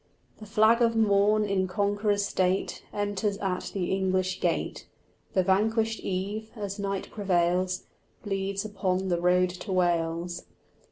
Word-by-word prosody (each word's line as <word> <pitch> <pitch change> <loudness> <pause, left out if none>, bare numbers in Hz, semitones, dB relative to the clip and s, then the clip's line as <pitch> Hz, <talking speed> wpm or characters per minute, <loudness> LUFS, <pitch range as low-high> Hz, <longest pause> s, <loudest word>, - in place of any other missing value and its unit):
The 215 - -10
flag 220 +2 +4
of 230 -1 +3
morn 210 0 +3
in 195 -2 0
conqueror's 205 +1 +1
state 185 0 0
Enters 205 0 -1
at 190 -2 -2
the 185 -3 -2
English 185 -1 0
gate: - - -1 0.5
The 185 - +3
vanquished 220 +4 +1
eve, 200 +4 -3
as 205 -2 -5
night 195 -1 -3
prevails, 185 -2 +1 0.4
Bleeds 195 -1 -2
upon 190 -2 -1
the 175 -1 0
road 180 0 +3
to 185 +3 -7
Wales. 175 -1 0
195 Hz, 130 wpm, -27 LUFS, 185-205 Hz, 0.5 s, flag